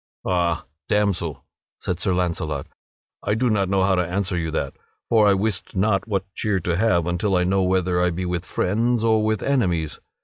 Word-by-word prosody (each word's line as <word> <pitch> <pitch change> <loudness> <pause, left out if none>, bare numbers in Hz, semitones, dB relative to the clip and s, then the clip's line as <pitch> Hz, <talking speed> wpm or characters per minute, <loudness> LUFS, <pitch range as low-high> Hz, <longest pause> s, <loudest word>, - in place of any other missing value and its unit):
"Ha, 85 -2 0 0.2
damsel," 95 -9 0 0.3
said - - -2
Sir - - 0
Launcelot, 80 -5 -1 0.6
"I 105 - 0
do 120 +1 +1
not 100 -3 +1
know 95 -1 +2
how 95 0 +3
to 90 - +2
answer 95 +2 -2
you 85 -2 -1
that, 70 -4 -2 0.4
for 110 -3 +5
I 100 - +5
wist 100 0 -2
not 100 +1 +1
what 100 -3 -1
cheer 105 -2 0
to 85 0 0
have 90 -4 +2
until 90 +3 0
I 90 - +2
know 95 +2 +2
whether 90 -1 +1
I 90 - +3
be 90 +2 -3
with 90 -1 -2
friends 115 +2 0
or 110 -1 +3
with 110 -1 0
enemies. 90 - 0
95 Hz, 195 wpm, -23 LUFS, 90-105 Hz, 0.6 s, for